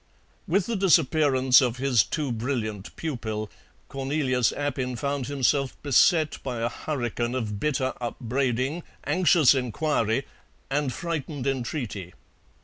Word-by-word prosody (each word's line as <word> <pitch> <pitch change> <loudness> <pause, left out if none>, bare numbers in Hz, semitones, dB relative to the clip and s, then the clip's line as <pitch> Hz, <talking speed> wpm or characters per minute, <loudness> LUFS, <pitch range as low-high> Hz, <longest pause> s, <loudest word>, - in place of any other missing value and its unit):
With 185 +2 +2
the 235 - -2
disappearance 150 -8 +4
of 125 -2 0
his 130 -3 +3
too 150 -5 -2
brilliant 110 -4 -3
pupil 110 -8 -4 0.4
Cornelius 135 -2 0
Appin 130 -3 -2
found 140 0 -2
himself 140 -1 0
beset 155 +3 +3
by 125 -3 -4
a 115 - +1
hurricane 120 -4 -3
of 105 -5 -3
bitter 130 -1 0
upbraiding, 130 +5 -1 0.2
anxious 170 -6 +4
inquiry, 130 -1 0 0.5
and 145 -1 0
frightened 150 -2 -4
entreaty. 120 - -3
135 Hz, 115 wpm, -26 LUFS, 120-150 Hz, 0.5 s, disappearance